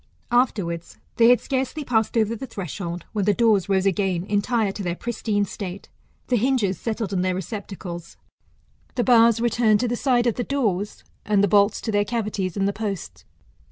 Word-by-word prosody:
''Afterwards, 195 -9 0 0.2
they 230 -1 +6
had 245 - +6
scarcely 270 +3 -2
passed 225 -3 +1
over 225 0 +2
the 265 +4 -7
threshold, 175 - -5
when 205 -3 0
the 205 -1 +3
doors 215 -5 +3
rose 190 -1 +2
again 190 -2 +1
entire 205 +2 0
to 200 - -7
their 175 -2 -2
pristine 215 -2 -1
state, 195 -1 -7 0.4
the 250 - +1
hinges 225 -5 +1
settled 220 -3 -3
in 185 - +1
their 185 0 0
receptacles; 185 -4 -7 0.8
the 245 - +1
bars 230 -2 +5
returned 230 -2 +3
to 245 - 0
the 240 - -1
sides 245 -1 +2
of 235 - +1
the 245 - 0
doors; 210 -8 -1 0.2
and 205 -1 +2
the - - +4
bolts 200 +1 +3
to 225 - -2
their 205 -1 +2
cavities 205 -5 -2
in 195 - +1
the 200 - 0
posts. 195 - -5
210 Hz, 185 wpm, -23 LUFS, 195-235 Hz, 0.8 s, they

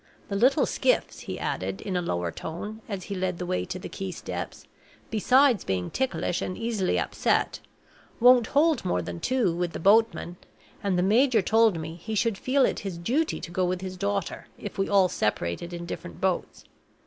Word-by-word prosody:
The 200 - -2
little 255 +8 +4
skiffs," - - 0
he - - -6
added, - - -3
in 195 -3 -4
a 180 - +1
lower 90 - -2
tone, 205 - -6
as 195 -3 -4
he 200 - -5
led 185 -2 -2
the 180 - -4
way 185 +1 -1
to 185 0 -5
the 185 - -7
quay 195 -1 -5
steps, 180 - -6 0.5
"besides 250 +2 +4
being 90 -2 -2
ticklish 260 -9 -1
and 185 - -3
easily 225 -5 0
upset, - - 0 0.6
won't 245 -1 +6
hold 305 -1 +3
more 90 0 0
than 85 0 -6
two, 235 - +1
with 175 -1 -2
the - - -4
boatman; 200 -2 +3 0.4
and 195 -3 0
the 180 - +2
major 225 +2 +4
told 220 -3 +4
me 160 0 -5
he 220 +6 -5
should 215 -1 +1
feel 265 +1 +3
it - - -1
his 195 -4 -5
duty 265 - 0
to 170 - -7
go 185 +1 0
with 180 0 -1
his 185 -1 -5
daughter, 200 0 -2
if 205 - -7
we 195 - +1
all 195 -2 +5
separated 105 - -2
in 170 0 -6
different 85 - -7
boats. - - -1
195 Hz, 195 wpm, -27 LUFS, 175-230 Hz, 0.6 s, won't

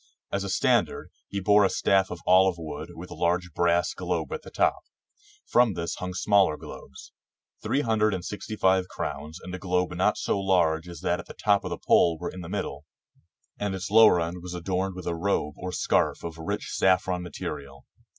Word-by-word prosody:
As 100 - -1
a 100 - -4
standard 95 - +1 0.2
he 100 - -3
bore 105 +2 +5
a 95 - +4
staff 95 -1 +2
of 85 -2 -7
olive 95 0 +5
wood 80 -2 -7
with 90 +2 -9
a - - -7
large 90 +1 0
brass 85 +1 +2
globe - - -3
at 465 - -4
the - - -11
top. - - +1 0.7
From 120 -5 +3
this 85 0 -3
hung 90 0 -5
smaller 100 -6 +3
globes. 65 - -11 0.5
Three 140 - 0
hundred 110 -4 +2
and 90 -1 -6
sixty 105 +1 -5
five 95 -2 +2
crowns 75 0 -5
and 90 - -9
a 95 - -5
globe 90 -1 0
not - - +1
so - - -1
large 90 -4 +2
as 85 - -9
that 85 - 0
at - - -9
the - - -10
top 100 -1 +2
of - - -4
the - - -4
pole 85 -1 +3
were 85 +2 -5
in 95 - -8
the 85 - -8
middle, 70 +2 -4 0.7
and 100 -2 -2
its 95 +1 -5
lower 110 -4 +7
end 85 +2 -3
was 90 0 -7
adorned 95 +2 -2
with 90 -2 -8
a 85 - -1
robe 85 -4 -1
or 90 - -4
scarf - - +1
of 80 -1 -6
rich 80 - -4
saffron 95 -1 +2
material. 70 -5 -7
90 Hz, 205 wpm, -26 LUFS, 85-95 Hz, 0.7 s, lower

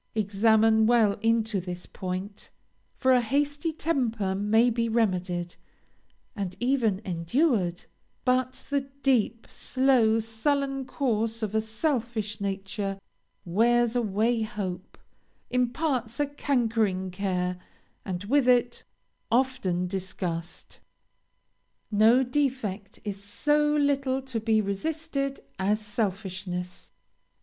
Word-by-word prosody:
Examine 220 +1 +4
well 225 -4 +3
into 225 -3 +1
this 180 0 -6
point; 185 +2 -6 0.5
for 260 - +3
a 250 - +5
hasty 290 +6 0
temper 240 -11 -1
may 220 +5 +3
be 230 0 0
remedied, 180 -6 0 0.8
and 195 -4 -4
even 240 -6 +1
endured 180 - 0 0.4
but 255 0 0
the 275 -1 0
deep, 235 -4 +2
slow, 255 -4 +3
sullen 270 +5 -1
course 230 -4 -1
of 210 -1 -2
a 220 - +2
selfish 220 -3 -2
nature 195 0 -3 0.5
wears 235 +6 +3
away 225 +1 +1
hope, 195 -5 -5 0.5
imparts 250 -1 0
a 290 - +3
cankering 225 -9 0
care, 180 -1 -2 0.4
and, 185 -1 -4
with 260 +5 +2
it, 245 -1 +3 0.5
often 235 -8 +1
disgust. 180 -2 -5 1.1
No 220 +5 +5
defect 250 -7 -2
is 200 -1 -5
so 295 +8 +1
little 275 -2 +1
to 260 -4 -3
be 220 0 +2
resisted 275 +6 -3 0.2
as 205 +3 +1
selfishness. 190 -4 -4
220 Hz, 105 wpm, -27 LUFS, 195-255 Hz, 1.1 s, a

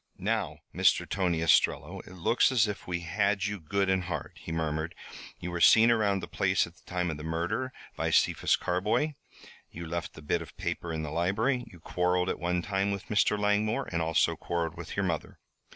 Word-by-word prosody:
"Now, 100 -7 -1 0.2
Mr. - - +3
Tom 90 -3 0
Ostrello, 80 -1 +2
it - - -11
looks 95 +9 +3
as 115 -4 +4
if 105 - -6
we 90 -1 -2
had 100 +4 0
you 105 -1 -3
good 100 +5 0
and 95 -1 +1
hard," 90 - -4
he - - -7
murmured. 80 0 -2 0.4
"You 90 - -5
were 85 -1 -3
seen 115 +5 +7
around 100 -4 +2
the - - -4
place - - +1
at - - -13
the - - -24
time 90 -1 -1
of 75 - -5
the 75 - -8
murder 85 +11 -2 0.2
by - - -1
Cephas - - +3
Carboy, 105 - 0 0.6
you 85 +1 -8
left 85 +1 -4
the 75 - -11
bit 85 +3 0
of 85 - -11
paper 85 - -3
in 80 -1 -3
the 75 - -5
library, 110 - 0
you 90 - -14
quarrelled 90 +2 0
at - - -2
one 90 0 0
time 95 +1 0
with 100 +2 -4
Mr. 105 -1 +3
Langmore 105 +5 +1
and 85 -1 0
also 80 -1 +2
quarrelled 85 -2 -3
with 85 -1 -7
your 100 - +1
mother. 85 -4 -3
90 Hz, 205 wpm, -29 LUFS, 85-105 Hz, 0.6 s, seen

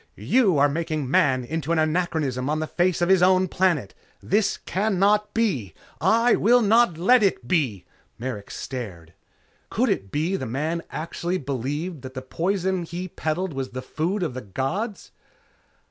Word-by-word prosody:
You 215 - +2
are 140 +1 +5
making 155 -2 -2
Man 145 -8 +3
into 160 +3 -3
an 170 - +2
anachronism 155 -5 0
on 155 +1 0
the 155 - -1
face 175 +1 +1
of 175 - +1
his 190 -2 +5
own 185 +1 +4
planet. 170 - 0 0.3
This 205 +1 +1
cannot 210 +1 +1
be! 145 - 0 0.3
I 230 +2 +4
will 240 +3 +4
not 220 -4 +4
let 240 +9 +5
it 185 - +1
be...." 130 - 0 0.3
Merrick 120 -4 -5
stared. 95 -11 -7 0.6
Could - - +1
it 95 0 -2
be 155 +5 0
that 195 - -1
the 130 - -4
man 155 +6 -1
actually 170 +3 -3
believed 145 +4 -4
that 130 +1 -9
the 130 - -5
poison 185 +5 -1
he 175 +2 -5
peddled 165 +2 -2
was 135 -1 -4
the 130 0 -6
food 175 +8 -2
of 155 - -2
the 130 - -5
gods? 165 - -4
165 Hz, 165 wpm, -24 LUFS, 135-190 Hz, 0.6 s, are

